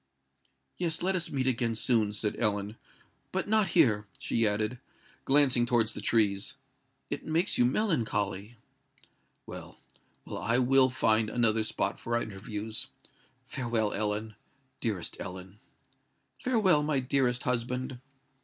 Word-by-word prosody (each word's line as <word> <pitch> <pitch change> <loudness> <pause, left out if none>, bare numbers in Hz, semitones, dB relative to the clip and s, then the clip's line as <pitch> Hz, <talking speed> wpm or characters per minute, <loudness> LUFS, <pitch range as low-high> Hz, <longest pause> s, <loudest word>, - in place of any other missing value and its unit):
"Yes—let 175 +2 0
us 170 -2 -1
meet 130 -2 -1
again 120 -3 0
soon," 110 -2 +2
said 105 0 -2
Ellen; 105 -1 0 0.6
"but 190 - -2
not 215 -1 +3
here," 105 -10 +4
she 115 -1 +1
added, 105 +3 -1 0.5
glancing 135 -4 +4
towards 115 -2 +2
the - - -5
trees. 105 -4 +1 0.6
"It - - -3
makes 165 +4 0
you 120 - +6
melancholy." 115 - -1 0.9
"Well—well: - - -11
I 115 +2 +1
will 130 +1 +5
find 110 -3 +2
another 115 -2 +2
spot 105 -2 -1
for 115 - -2
our 120 - +1
interviews. 105 +2 -5 0.6
Farewell, 115 -4 -1
Ellen—dearest 110 0 -4
Ellen." 95 +2 -8 0.8
"Farewell, 210 -11 +3
my 150 -2 +1
dearest 125 -1 +1
husband." 125 +1 -2
115 Hz, 115 wpm, -29 LUFS, 105-135 Hz, 0.9 s, you